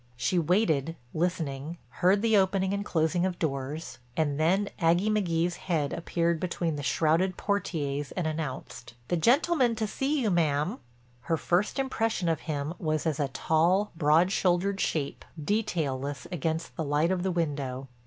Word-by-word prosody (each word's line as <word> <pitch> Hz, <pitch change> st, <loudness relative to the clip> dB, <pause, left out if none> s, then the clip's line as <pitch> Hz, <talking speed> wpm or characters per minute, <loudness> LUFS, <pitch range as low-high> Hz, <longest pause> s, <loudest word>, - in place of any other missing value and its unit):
She 150 Hz, +10 st, +1 dB
waited 165 Hz, -3 st, +1 dB, 0.2 s
listening, 160 Hz, -2 st, -2 dB, 0.2 s
heard 195 Hz, +4 st, +4 dB
the 225 Hz, -1 st, +4 dB
opening 190 Hz, 0 st, +2 dB
and 200 Hz, 0 st, -1 dB
closing 170 Hz, -1 st, +1 dB
of 185 Hz, -1 st, -1 dB
doors 145 Hz, +1 st, -3 dB, 0.2 s
and 145 Hz, -2 st, +1 dB
then 190 Hz, +6 st, +2 dB
Aggie 175 Hz, +5 st, +3 dB
McGee's 175 Hz, -4 st, 0 dB
head 155 Hz, -6 st, -1 dB
appeared 170 Hz, 0 st, 0 dB
between 170 Hz, -2 st, -1 dB
the 145 Hz, -, -4 dB
shrouded 165 Hz, +6 st, +1 dB
portières 145 Hz, -8 st, -2 dB
and 180 Hz, -, 0 dB
announced, 140 Hz, -6 st, -5 dB
"The -, -, +2 dB
gentleman 255 Hz, -, +3 dB
to 220 Hz, 0 st, -1 dB
see 270 Hz, +7 st, -1 dB
you, 225 Hz, -6 st, +1 dB
ma'am." 160 Hz, -, +1 dB, 0.4 s
Her 165 Hz, +6 st, -1 dB
first 175 Hz, -, 0 dB
impression 225 Hz, -9 st, 0 dB
of 160 Hz, -3 st, +1 dB
him 145 Hz, +1 st, -2 dB
was 155 Hz, -2 st, -1 dB
as 160 Hz, -2 st, 0 dB
a 145 Hz, -, +1 dB
tall, 170 Hz, +9 st, +2 dB
broad 160 Hz, +3 st, +4 dB
shouldered 190 Hz, +1 st, +1 dB
shape, 145 Hz, -3 st, -2 dB, 0.2 s
detailless 145 Hz, -7 st, -1 dB
against 165 Hz, -1 st, -2 dB
the 160 Hz, -, -2 dB
light 150 Hz, +4 st, +1 dB
of 185 Hz, -1 st, 0 dB
the 190 Hz, -, 0 dB
window. 140 Hz, -6 st, -2 dB
170 Hz, 155 wpm, -28 LUFS, 150-190 Hz, 0.4 s, heard